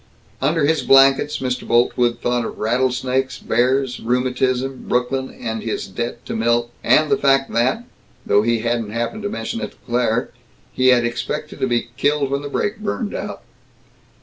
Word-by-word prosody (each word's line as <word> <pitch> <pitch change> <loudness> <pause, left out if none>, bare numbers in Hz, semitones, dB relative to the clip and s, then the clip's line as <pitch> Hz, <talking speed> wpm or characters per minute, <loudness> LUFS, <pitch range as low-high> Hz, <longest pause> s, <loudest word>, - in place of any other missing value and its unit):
Under 150 +2 +2
his 160 +2 +2
blankets 135 +2 +5
Mr. 125 -1 -3
Boltwood 120 0 +2
thought 120 0 0
of - - -6
rattlesnakes, 130 +3 0
bears, 125 +2 +1
rheumatism, 130 +2 -1
Brooklyn, 130 +2 0 0.3
his 115 - -3
debt 120 +4 -5
to - - -4
Milt, 120 +1 +1
and 150 +6 +4
the 210 - +4
fact 135 -5 +2
that 130 - +1 0.4
though 100 - +4
he 115 +1 +1
hadn't 115 -2 -1
happened 115 - -3
to 205 - -3
mention 230 +2 -4
it - - -5
to - - -28
Claire 120 -1 0 0.4
he 130 - +2
had 125 -2 +5
expected 120 +5 -4
to 130 - +1
be 120 -1 -1
killed 145 -1 +1
when 140 0 0
the 145 - -6
brake 205 +9 -1
had 215 - -13
burned 210 +1 -2
out. 205 +1 -5
125 Hz, 170 wpm, -20 LUFS, 120-140 Hz, 0.4 s, blankets